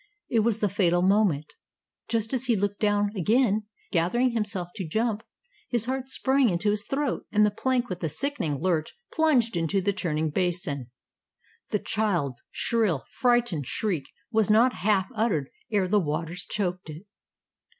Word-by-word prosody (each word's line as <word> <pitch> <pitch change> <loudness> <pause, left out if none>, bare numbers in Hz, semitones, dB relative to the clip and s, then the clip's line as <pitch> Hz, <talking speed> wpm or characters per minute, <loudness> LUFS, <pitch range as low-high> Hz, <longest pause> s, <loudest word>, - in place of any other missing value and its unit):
It 230 - +3
was 220 0 +1
the 210 - +3
fatal 175 -3 +2
moment. 190 -7 +2 0.5
Just 225 +1 -1
as 260 -1 0
he 240 -2 +3
looked 205 0 -1
down 205 -1 +2
again, 215 +2 +2 0.2
gathering 215 +9 +2
himself 205 -6 -2
to 190 -5 -5
jump, 220 +4 0 0.5
his 235 -3 0
heart 260 +1 -3
sprang 265 -1 +3
into 185 +3 +1
his 205 0 -1
throat, 275 -1 -2
and 210 0 +4
the 210 - +2
plank 250 +3 0
with 180 -3 -6
a 160 - 0
sickening 160 - -2
lurch 165 -3 0 0.2
plunged 265 - +3
into 170 +3 +1
the 200 +2 0
churning 160 -5 -1
basin. 170 -7 -2 0.8
The - - +1
child's 175 - -1
shrill, 215 - 0
frightened 240 - +1
shriek 175 -4 -1 0.3
was 220 -3 +2
not 235 +4 +5
half 195 -1 +1
uttered 210 - 0 0.2
ere 200 -3 +2
the 205 +3 +3
waters 165 +2 -3
choked 180 -4 -2
it. 155 +4 -8
205 Hz, 160 wpm, -26 LUFS, 175-230 Hz, 0.8 s, not